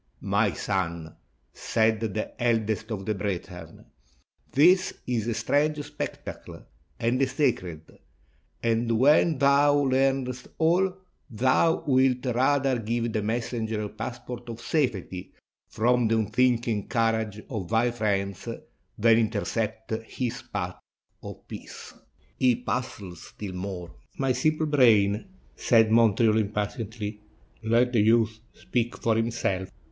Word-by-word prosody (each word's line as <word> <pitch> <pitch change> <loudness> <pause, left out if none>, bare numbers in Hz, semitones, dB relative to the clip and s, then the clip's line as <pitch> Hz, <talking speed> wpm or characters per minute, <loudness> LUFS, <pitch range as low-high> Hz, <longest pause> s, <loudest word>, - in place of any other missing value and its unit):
"My - - +2
son," 85 -5 -3 0.4
said 110 -1 +1
the 110 -1 -3
eldest 110 -2 0
of 100 -4 -4
the 110 - 0
brethren, 90 -4 -6 0.7
"this 180 +6 +4
is 120 -3 -1
a 115 - -1
strange 145 +6 +1
spectacle, - - -7 0.4
and 120 +3 +1
a 135 - +3
sacred; 120 - -2 0.6
and 115 0 +1
when 150 +5 +4
thou 140 +1 +4
learnest 135 -2 +1
all, 175 +4 +3 0.4
thou 130 +7 +2
wilt 130 -2 +2
rather 130 +1 +2
give 115 +1 -2
the 110 - 0
messenger 110 0 -2
a 105 - -4
passport 120 +1 -7
of 115 -1 -6
safety 115 - -2 0.4
from 120 +1 +2
the 115 +1 +2
unthinking 115 -1 +1
courage 110 -3 0
of 105 -8 -5
thy 115 +2 +2
friends 100 -4 -2 0.5
than 115 +1 +5
intercept 110 0 -2
his 125 +2 -4
path 90 -3 -4 0.4
of - - -10
peace." - - -10 0.5
"Ye 125 -2 +4
puzzle 120 -6 -4
still 95 +3 -9
more 90 -2 -6 0.3
my 135 -1 +1
simple 155 +5 +1
brain," 110 -8 +4 0.3
said 115 -3 +3
Mon 115 -3 +5
treal 110 -1 +3
impatiently; 105 0 -4 0.4
"let 120 +3 +2
the 115 - +4
youth 110 0 +3 0.2
speak 120 -1 -2
for 115 -1 +1
himself. 115 -5 -1
115 Hz, 120 wpm, -26 LUFS, 105-125 Hz, 0.7 s, than